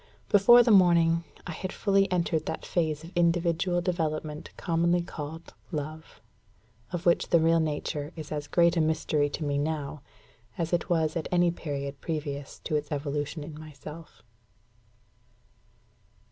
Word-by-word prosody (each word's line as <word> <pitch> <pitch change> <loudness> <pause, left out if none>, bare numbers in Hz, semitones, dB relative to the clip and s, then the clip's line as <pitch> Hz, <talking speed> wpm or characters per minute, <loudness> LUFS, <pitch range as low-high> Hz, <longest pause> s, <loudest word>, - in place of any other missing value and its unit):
Before 240 +4 +7
the 235 - +3
morning, 170 -3 +5 0.2
I 180 - -5
had 185 +3 -5
fully 195 -2 +2
entered 170 -3 0
that - - -4
phase 155 -3 -1
of 165 - -10
individual 175 +1 +2
development 155 -4 -2
commonly 170 0 +1
called 160 0 -8 0.2
love, 155 -5 -6 0.7
of 175 +1 -4
which 170 - +3
the 170 - +5
real 165 +1 +4
nature 150 -1 -2
is 155 -3 -8
as 150 -1 -3
great 170 0 +3
a 165 - +3
mystery 155 -2 +1
to 155 - -4
me 145 -1 0
now, 150 -1 -3 0.6
as 165 0 -2
it 175 - 0
was 160 -2 +1
at 165 - -2
any 175 -1 +3
period 140 -4 -5
previous 145 -3 -4
to 155 - -2
its 150 -1 -2
evolution 145 +1 -3
in 155 +1 -8
myself. 155 +1 -11
160 Hz, 145 wpm, -28 LUFS, 150-175 Hz, 0.7 s, Before